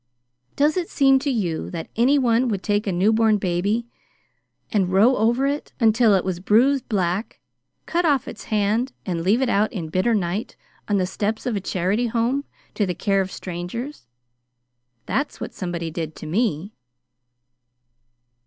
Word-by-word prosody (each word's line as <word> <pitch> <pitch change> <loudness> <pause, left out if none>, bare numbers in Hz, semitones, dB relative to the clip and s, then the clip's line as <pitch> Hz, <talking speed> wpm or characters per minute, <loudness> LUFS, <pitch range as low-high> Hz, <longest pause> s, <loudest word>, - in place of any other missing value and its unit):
Does 300 +4 +2
it 350 -2 -2
seem 270 -2 +4
to 285 +2 -2
you 185 -11 -1
that 165 -2 -6
anyone 250 0 +3
would 200 -5 -2
take 205 0 0
a - - +1
newborn 215 +4 +3
baby 200 +5 0 0.9
and 190 -4 +1
row 215 +7 +5
over 235 +5 +2
it, 285 +1 -2
until 225 -2 +4
it 185 - 0
was 185 -2 -2
bruised 245 +8 +2
black, 190 0 -1 0.5
cut 345 +1 0
off 285 -7 +2
its 215 - -8
hand, 220 +4 0
and 175 -3 -2
leave 210 +9 +2
it - - +1
out 210 0 +2
in 190 -9 -4
a - - -16
bitter 205 +7 +2
night 190 +2 -2 0.3
on 205 - +1
the 185 - +1
steps 210 +4 -3
of 245 -3 -1
a 200 - -2
charity 195 +6 0
home, 240 +5 0 0.3
to 205 - 0
the 180 - -2
care 195 +2 +1
of 190 0 -4
strangers? 180 - -6 1.0
That's 285 +2 -2
what - - -6
somebody 170 -3 -4
did 160 -1 -5
to - - -9
me." 195 +1 -1
210 Hz, 165 wpm, -23 LUFS, 185-245 Hz, 1.0 s, row